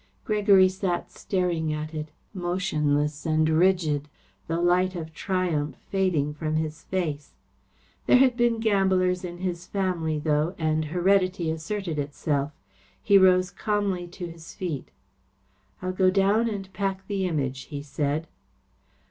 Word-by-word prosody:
Gregory 205 -3 +5
sat 185 -2 -2
staring 175 -5 -1
at 155 +1 -4
it, 155 0 -4 0.2
motionless 155 -6 0
and 155 -1 +2
rigid, 160 -3 +2 0.4
the 165 +1 -1
light 180 +2 +2
of 160 -2 -6
triumph 160 -6 -1 0.2
fading 175 -7 +1
from 155 +1 -2
his 155 0 -3
face. 155 -6 -3 0.7
There - - +7
had 255 -1 +4
been 240 -2 +2
gamblers 190 -4 +2
in 175 -1 -6
his 175 -1 -4
family, 175 -5 -1
though, 150 +3 0
and 155 -1 0
heredity 180 +1 +2
asserted 165 0 -3
itself. 145 0 -1 0.5
He 200 -1 +5
rose 185 0 +4
calmly 195 -3 -1
to 175 +1 -7
his 165 -1 -10
feet. 165 -8 -4 0.9
"I'll 185 - -1
go 185 0 +4
down 200 +4 +3
and 195 -3 -6
pack 195 -1 -2
the 195 -2 -1
Image," 135 -5 -2
he 145 -2 -6
said. 145 +2 -1
175 Hz, 135 wpm, -26 LUFS, 155-190 Hz, 0.9 s, There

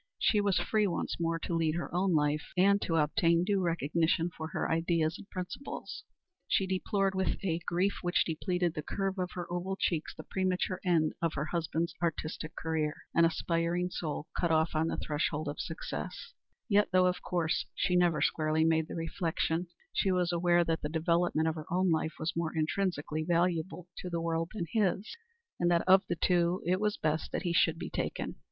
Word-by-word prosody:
She 210 - +3
was 200 -2 +2
free 215 -2 +2
once 175 - -2
more 165 0 0
to 165 - -4
lead 165 -1 +1
her 175 - -4
own 180 0 +2
life, 150 0 0
and 200 +2 +5
to 165 - 0
obtain 165 +2 +3
due 195 +1 +1
recognition 165 0 +1
for 160 - -5
her - - -2
ideas 165 0 +1
and 195 - -12
principles. 185 +9 -6 0.4
She 195 - +2
deplored 195 +1 0
with 190 0 0
a 165 -3 0
grief 185 +3 +1
which 175 -1 +2
depleted 175 +1 -1
the 155 - -3
curve 195 +4 -2
of 180 0 -1
her 175 -1 -4
oval 185 +2 -2
cheeks 170 -4 -1
the - - -8
premature 185 0 -1
end 165 -4 +2
of 165 -2 0
her 150 0 -1
husband's 165 0 -1
artistic 160 -1 -3
career 155 -2 -1 0.2
an 170 - +5
aspiring 170 +2 0
soul 155 -3 -3
cut 170 - +1
off 160 0 +3
on 160 +1 +1
the - - -2
threshold 150 0 -1
of 145 - -4
success 160 - -5 0.3
yet, 205 -1 +3
though 185 0 +5
of 180 0 +1
course 170 -3 -1
she 180 -2 +1
never 175 -3 +3
squarely 155 0 +2
made 160 -1 +2
the - - -6
reflection, 165 0 -1 0.3
she 195 - +2
was 180 -1 +1
aware 175 0 +3
that 165 -1 -1
the 150 - -3
development 165 0 +1
of 160 - +1
her 155 0 -8
own 185 0 +2
life 160 0 0
was 160 +2 -2
more 165 -1 -2
intrinsically 155 -2 -1
valuable 175 +1 0
to 180 - -5
the 170 -1 -2
world 165 0 -1
than 180 -5 -2
his, 205 -1 0 0.4
and 175 - +3
that 170 0 +2
of 190 +1 +7
the 175 - +1
two 175 +1 +2
it 180 +2 +2
was 210 0 0
best 155 +1 -1
that - - -2
he 175 -2 0
should 165 -1 +3
be - - -6
taken. - - -3
170 Hz, 195 wpm, -31 LUFS, 160-180 Hz, 0.4 s, of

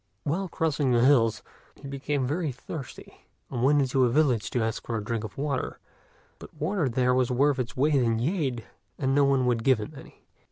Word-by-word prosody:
While 180 +7 -1
crossing 150 -6 0
the 120 +1 +4
hills, 120 -5 +3 0.3
he 140 - -11
became 140 0 -2
very 150 +3 -1
thirsty, 135 +2 -10 0.2
and 125 -3 -3
went 145 +2 +4
into 130 0 +1
a 125 - +4
village 125 -5 +2
to 120 - 0
ask 110 -1 -3
for 115 - -1
a 105 - -4
drink 115 0 -3
of 105 -3 -8
water; 140 -2 -2 0.6
but - - -11
water 165 -2 -1
there 125 +1 +2
was 125 -1 +2
worth 135 +2 +2
its 125 0 -4
weight 150 +4 +2
in 120 -5 +2
jade, 130 - -1 0.3
and 135 -1 0
no 140 0 +4
one 135 -2 +2
would 120 -2 +1
give 130 -1 +4
him 105 +8 -7
any. 135 - -14
130 Hz, 205 wpm, -27 LUFS, 120-145 Hz, 0.6 s, the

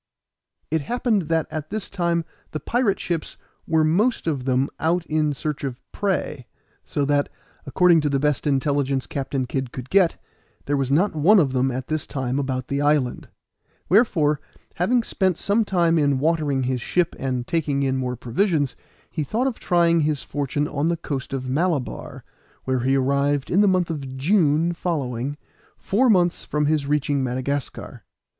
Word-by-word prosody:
It 160 -1 +1
happened 220 - 0
that 165 -1 +2
at 155 -1 -5
this 215 0 -4
time 170 -3 -1 0.3
the 155 - -2
pirate 235 -1 0
ships 170 -3 -3 0.3
were 160 -1 +3
most 200 +11 +2
of 140 -6 -1
them 130 +1 +2
out 170 +1 +1
in 155 -1 +1
search 145 +1 -4
of 130 -3 -4
prey, 175 - -2 0.4
so 145 - -1
that, 145 0 +1 0.4
according 170 +2 +4
to 150 - 0
the 140 - +1
best 150 0 0
intelligence 140 -1 +1
Captain 135 -1 -3
Kid 130 0 -3
could 130 0 -8
get, 190 -3 +3 0.5
there 145 - 0
was 135 -2 0
not 170 +9 +2
one 175 +8 +5
of 145 -8 +3
them 130 +1 +2
at 130 0 -4
this 155 0 -3
time 130 0 -2
about 130 -2 -2
the 140 +1 -1
island, 145 -4 +1 0.6
wherefore, 165 - +3 0.3
having 230 +8 +1
spent 190 -5 0
some 210 +3 +1
time 170 -5 +2
in 140 -2 +2
watering 145 -2 +1
his 125 -1 -1
ship 175 +7 0
and 130 -2 -2
taking 145 -2 0
in 135 -1 +1
more 125 -1 -2
provisions, 145 - 0 0.4
he 155 - -2
thought 225 - -1
of 260 -4 -2
trying 170 -1 +3
his 150 -2 0
fortune 145 0 -2
on 145 +2 -1
the 170 0 0
coast 140 -5 -5
of 130 -1 -3
Malabar, 150 0 -2 0.4
where 130 -1 0
he 130 +3 +2
arrived 140 +1 +1
in 190 - +4
the 205 - +5
month 185 -3 +2
of 135 -4 -6
June 165 +1 +2
following, 145 -6 -3 0.4
four 245 +6 +2
months 175 -5 +3
from 150 0 -1
his 150 -1 +1
reaching 145 -1 +1
Madagascar. 130 +2 -4
150 Hz, 170 wpm, -23 LUFS, 135-170 Hz, 0.6 s, one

